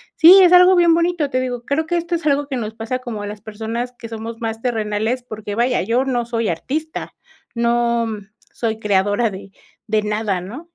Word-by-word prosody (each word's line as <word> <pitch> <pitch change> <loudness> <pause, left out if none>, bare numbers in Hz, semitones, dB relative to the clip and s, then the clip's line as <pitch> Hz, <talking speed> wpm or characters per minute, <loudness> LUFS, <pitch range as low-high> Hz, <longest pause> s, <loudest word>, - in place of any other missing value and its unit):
sí, 365 +4 +9
es 355 - +5
algo 360 +1 +7
bien 345 -2 +5
bonito, 335 -3 +1
te 255 - +1
digo, 250 -2 -3
creo 290 +5 0
que 345 - 0
esto 340 +1 -3
es 335 - -4
algo 285 0 +2
que 275 - -4
nos 220 -2 -4
pasa 230 +3 -3
como 235 -5 -6
a - - -5
las 205 0 -8
personas 225 +3 -5
que 230 - -9
somos 225 0 -7
más 225 -1 -4
terrenales, 225 +1 -1
porque 215 -3 -7
vaya, 245 +2 +1
yo 245 +3 0
no 245 -3 -1
soy 230 -2 -1
artista, 305 - -4 0.4
no 235 0 +1 0.5
soy 225 -2 -2
creadora 205 +2 +1
de, 195 0 -9 0.4
de 215 -1 +1
nada, 210 -2 -1
¿no? 255 - -9
235 Hz, 200 wpm, -19 LUFS, 220-280 Hz, 0.5 s, sí